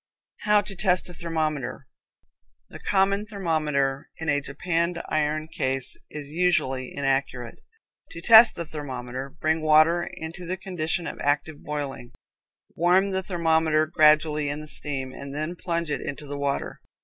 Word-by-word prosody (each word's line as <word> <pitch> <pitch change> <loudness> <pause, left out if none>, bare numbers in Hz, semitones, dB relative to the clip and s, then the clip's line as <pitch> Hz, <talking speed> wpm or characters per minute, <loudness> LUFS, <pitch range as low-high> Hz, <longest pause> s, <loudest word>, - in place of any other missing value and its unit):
How 210 0 +5
to 205 -1 -9
Test 180 -1 +1
a - - -8
Thermometer. 155 -5 -3 0.8
The - - -10
common 200 +1 +1
thermometer 155 -9 -1
in 160 0 -4
a 145 -1 +2
japanned 170 +4 -1
iron 155 0 0
case 135 -5 -1
is 145 -2 -8
usually 150 -7 +1
inaccurate. 135 -3 -2 0.5
To - - -9
test 225 +5 +8
the 170 - -3
thermometer, 130 -3 -6
bring 160 +3 -1
water 155 +3 +4
into 170 0 -7
the 185 +2 -2
condition 175 -2 -2
of - - -6
active 145 +1 -1
boiling, 140 -5 -5 0.6
warm 185 +4 +3
the 190 0 0
thermometer 160 -4 +2
gradually 155 -2 +3
in 145 +1 -3
the 155 - -9
steam 135 -3 -1
and 140 0 -8
then 155 +4 -3
plunge 170 -3 -2
it - - -2
into 145 +1 -6
the 145 0 -6
water. 140 -1 -3
155 Hz, 150 wpm, -25 LUFS, 145-175 Hz, 0.8 s, test